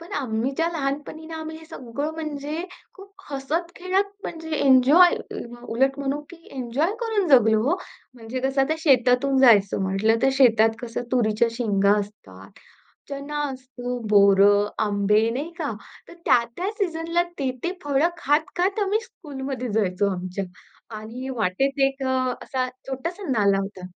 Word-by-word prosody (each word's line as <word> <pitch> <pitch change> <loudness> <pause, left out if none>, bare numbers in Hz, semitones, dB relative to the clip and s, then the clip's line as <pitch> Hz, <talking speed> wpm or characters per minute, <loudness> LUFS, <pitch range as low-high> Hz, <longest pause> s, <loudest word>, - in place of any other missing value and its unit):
पण 335 - -12
आम्हीच्या 265 +6 -1
लहानपणी 295 +1 -4
आम्ही 315 0 -6
हे 320 - -13
सगळं 280 +2 -5
म्हणजे 305 +1 -4 0.3
खूप 390 0 -14 0.2
हसत-खेळत 345 +7 -2
म्हणजे 320 -1 -7
एन्जॉय, 280 +7 +6
अ, 240 0 -9
उलट 270 +3 +2
म्हणू 280 +1 -2
की 350 - -11 0.2
एन्जॉय 265 - -1
करून 440 -5 0
जगलो 220 -5 +5
हो. 350 - +2 0.4
म्हणजे 240 +1 -6
कसं 270 +1 0
आता 310 +4 0
शेतातून 265 -2 +3
जायचं 205 -6 +5
म्हंटल 195 +4 +2
तर, 270 - +5
शेतात 225 -4 +4
कसं 240 0 -4
तुरीच्या 230 -2 +2
शेंगा 205 -4 +2
असतात, 100 - -9 0.6
चना 285 +1 -4
असतो, 250 -1 -6
बोर, 200 -1 +6 0.4
आंबे 210 +1 +2
नाही 280 +8 -4
का? 295 -5 -2 0.4
तर - - -12
त्या-त्या 240 - +1
सीझनला, 335 -2 0 0.2
ते-ते 265 +5 -2
फळ 285 0 +1
खात-खात 350 +6 0
आम्ही 405 +2 +1
स्कूलमध्ये 270 - -6
जायचो. 200 -2 +1
आमच्या 185 +2 -4 0.5
आणि 235 +5 -7
वाटेत 245 +7 0
एक 270 0 -6
अ, 255 -1 0
असा 255 -1 -2 0.2
छोटासा 335 +9 -5
नाला 200 -5 +3
होता. 195 -2 -7
265 Hz, 140 wpm, -24 LUFS, 225-315 Hz, 0.6 s, एन्जॉय